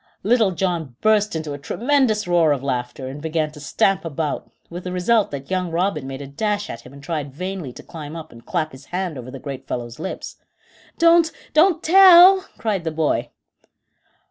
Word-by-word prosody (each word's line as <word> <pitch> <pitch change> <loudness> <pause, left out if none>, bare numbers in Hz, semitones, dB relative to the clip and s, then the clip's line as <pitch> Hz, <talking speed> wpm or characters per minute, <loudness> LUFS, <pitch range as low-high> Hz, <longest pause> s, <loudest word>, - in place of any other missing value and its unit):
Little 225 -1 +3
John 170 -7 -2
burst 215 -2 +2
into 155 -2 -4
a 145 - -7
tremendous 240 - +1
roar 170 -4 +4
of 135 -2 -4
laughter, 130 0 -3
and 140 +3 -7
began 160 -1 -1
to 150 - -13
stamp 190 +6 +1
about, 155 -2 -3 0.2
with 175 +1 -8
the 180 - -5
result 200 +4 +2
that 140 +3 -7
young 185 -1 -1
Robin 165 -4 -1
made 135 +1 -6
a - - -7
dash 205 +9 -2
at - - -8
him 125 - -14
and 140 0 -13
tried 145 -3 -4
vainly 180 -1 -5
to - - -12
climb 155 -1 -9
up 160 -1 -8
and 115 0 -14
clap 160 -4 -2
his 130 +1 -13
hand 180 -1 -3
over 130 -1 -8
the 135 - -8
great 135 -1 -8
fellow's 120 -1 -5
lips. 190 - -6 0.6
"Don't 335 -1 +5 0.2
don't 330 +3 +4
tell," 375 +1 +8 0.2
cried 205 -6 -2
the 165 - -1
boy. 155 -1 -1
165 Hz, 195 wpm, -21 LUFS, 140-210 Hz, 0.6 s, tell